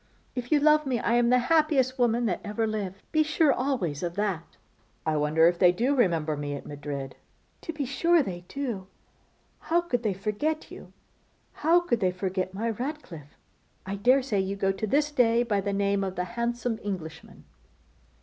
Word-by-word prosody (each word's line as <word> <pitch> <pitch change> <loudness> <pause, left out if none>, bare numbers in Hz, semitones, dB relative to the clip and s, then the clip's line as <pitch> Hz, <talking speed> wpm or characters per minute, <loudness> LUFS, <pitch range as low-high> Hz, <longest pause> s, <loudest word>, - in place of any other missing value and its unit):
If 250 +1 -5
you 300 - +5
love 300 0 +4
me 255 -2 +1
I 230 - 0
am 240 0 +3
the 250 - +5
happiest 270 -2 +2
woman 240 0 +2
that 185 -6 -1
ever 210 +2 -1
lived. 200 -3 -4
Be 310 - +3
sure 310 -1 +3
always 240 - -1
of 175 -1 -3
that.' 195 -5 -3 0.5
'I 155 -1 +1
wonder 155 +2 +4
if 175 0 +1
they 180 -1 +6
do 240 +10 +1
remember 165 - +1
me 145 0 -4
at 140 - -8
Madrid!' 145 -2 -6 0.5
'To 330 - -5
be 295 -3 -3
sure 330 +5 +3
they 175 -6 -6
do. 240 -9 -4 0.7
How 335 +1 +1
could 300 -9 -1
they 210 -5 -1
forget 215 +11 -2
you; - - -11 0.6
how 335 +3 +3
could 240 -10 0
they 185 -3 +2
forget 185 0 -2
my 225 +5 -2
Ratcliffe? 220 - -7 0.5
I 195 +1 -3
daresay 250 +1 +2
you 190 +1 -1
go 195 -1 +1
to 195 +3 -3
this 295 +6 +1
day 240 -4 +3
by 205 -4 0
the 200 +1 -2
name 200 0 +1
of 190 -1 -3
the 180 - -1
handsome 235 -1 -2
Englishman. 165 -6 -7
215 Hz, 185 wpm, -27 LUFS, 185-265 Hz, 0.7 s, they